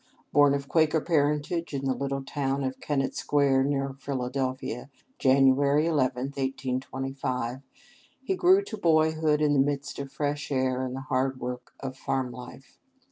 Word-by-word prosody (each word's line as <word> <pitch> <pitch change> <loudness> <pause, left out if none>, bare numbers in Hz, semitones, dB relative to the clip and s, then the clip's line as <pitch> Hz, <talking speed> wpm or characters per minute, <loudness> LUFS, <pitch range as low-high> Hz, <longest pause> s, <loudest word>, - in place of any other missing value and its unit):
Born 145 -1 +5
of 140 0 -4
Quaker 160 0 +3
parentage 150 +1 0
in 135 0 -3
the 135 - +2
little 135 +1 -3
town 140 -1 -1
of 130 0 -3
Kennett 135 -2 -1
Square, 140 -2 +2
near 135 -1 -1
Philadelphia, 130 -1 -3 0.3
Jan. 135 0 +5
11, 145 +4 +2
1825, 130 -1 -2 0.6
he 385 - 0
grew 375 +2 +5
to 220 - -7
boyhood 155 -3 +2
in 150 -1 +3
the 140 - +3
midst 140 +1 -1
of 140 -1 -6
fresh 145 +1 -3
air 130 -1 +1
and 130 0 -4
the 135 - -5
hard 130 0 -1
work 125 0 -6
of 130 -1 -5
farm 130 -1 -2
life. 125 +1 -12
135 Hz, 150 wpm, -27 LUFS, 130-145 Hz, 0.6 s, Born